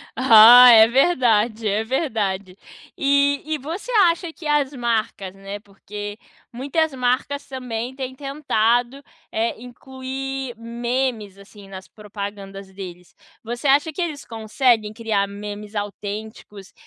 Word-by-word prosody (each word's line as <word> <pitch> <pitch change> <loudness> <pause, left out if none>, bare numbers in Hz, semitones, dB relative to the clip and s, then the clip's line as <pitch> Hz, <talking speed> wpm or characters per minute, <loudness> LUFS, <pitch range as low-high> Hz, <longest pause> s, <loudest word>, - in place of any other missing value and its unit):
Ah, 245 0 +9
é 220 -1 +8
verdade, 235 -5 +2
é 210 +2 0
verdade. 205 - -2 0.4
E 280 0 +2
e 310 0 -2
você 330 - -7 0.2
acha 335 -1 -4
que 320 - -9
as 295 -2 +1
marcas, 225 -6 -2
né, 195 +1 -8
porque 205 +1 -9 0.3
muitas 280 +5 -1
marcas 260 +3 -1
também 250 -2 -5
têm 260 -1 -6
tentado, 260 -2 -1 0.3
eh, 225 0 -2
incluir 265 +1 -7
memes 235 -3 -3
assim, 200 0 -15
nas 190 -1 -10
propagandas 200 -2 -9
deles. 180 -2 -10 0.3
Você 240 +5 -4
acha 285 +3 +3
que 360 - -4
eles 310 -5 -4
conseguem 225 -1 0
criar 215 -3 -1
memes 205 +1 -8
autênticos, 205 -1 -7
235 Hz, 120 wpm, -21 LUFS, 205-270 Hz, 0.4 s, Ah